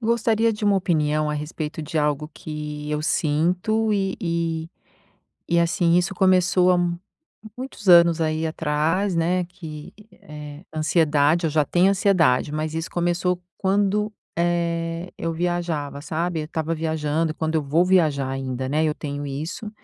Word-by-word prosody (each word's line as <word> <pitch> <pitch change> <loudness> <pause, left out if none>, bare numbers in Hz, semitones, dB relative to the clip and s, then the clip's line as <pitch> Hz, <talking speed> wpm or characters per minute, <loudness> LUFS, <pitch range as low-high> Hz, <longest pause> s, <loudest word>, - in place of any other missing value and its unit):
Gostaria 230 -1 +2
de 210 0 -5
uma 205 -1 +4
opinião 155 -4 +1
a 150 - -1
respeito 150 +1 -5
de 155 +1 -3
algo 150 0 0
que 150 -1 -6
eu 150 0 -1
sinto 180 +9 +1
e 195 -2 0
e 165 -2 -2 0.8
e, 170 - +4
assim, 170 0 +2
isso 180 +2 +1
começou 185 -1 +4
há - - +3 0.8
muitos 250 -6 -7
anos 170 -1 +7
aí 155 0 0
atrás, 160 +5 0
né, 175 +2 +1
que, 160 -4 -10 0.2
eh 150 0 -10
ansiedade. 155 +1 +2
Eu - - 0
já 150 0 +2
tenho 180 +5 +3
ansiedade, 175 -9 +2
mas 155 +1 -3
isso 165 0 -3
começou 175 +1 0 0.2
quando, 205 +2 +1 0.2
eh, 170 0 -1
eu 165 - -2
viajava, 165 -4 -2
sabe. 165 +1 -2
Eu - - -4
estava 160 +1 -2
viajando, 160 0 -1
e - - -18
quando 160 0 -2
eu 155 - +1
vou 145 +5 +2
viajar 155 -7 +2
ainda, 130 -1 -3
né, 155 +3 +1
eu 155 -1 +1
tenho 145 -1 -5
isso. 155 +10 -5
165 Hz, 155 wpm, -23 LUFS, 150-180 Hz, 0.8 s, anos